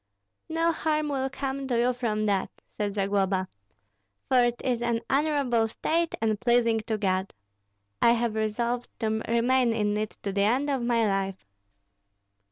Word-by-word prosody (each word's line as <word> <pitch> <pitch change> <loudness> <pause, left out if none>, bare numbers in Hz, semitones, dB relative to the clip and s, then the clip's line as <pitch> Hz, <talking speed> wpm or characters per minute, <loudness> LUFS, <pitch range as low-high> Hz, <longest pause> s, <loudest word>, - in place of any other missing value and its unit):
"No 330 +1 +2
harm 305 -2 -1
will 270 -1 -1
come 270 0 -4
to 245 -3 0
you 245 +2 +2
from 220 -4 -1
that," 200 -2 +1 0.3
said 205 -1 -2
Zagloba, 195 -1 +1 0.8
"for 255 -2 +4
it 240 0 +1
is 245 -2 0
an 235 -1 0
honorable 275 -5 +2
state 330 +8 -1
and 220 -2 0
pleasing 235 -2 +3
to 220 - 0
God. 190 -1 -1 0.7
I 235 - +6
have 235 -1 0
resolved 235 +3 -1
to 220 0 0
remain 240 +1 +3
in 210 -2 0
it 215 0 -4
to 200 - -2
the 200 - +1
end 255 +8 +2
of 270 -2 0
my 235 -1 +2
life. 195 - -2
235 Hz, 160 wpm, -27 LUFS, 210-260 Hz, 0.8 s, I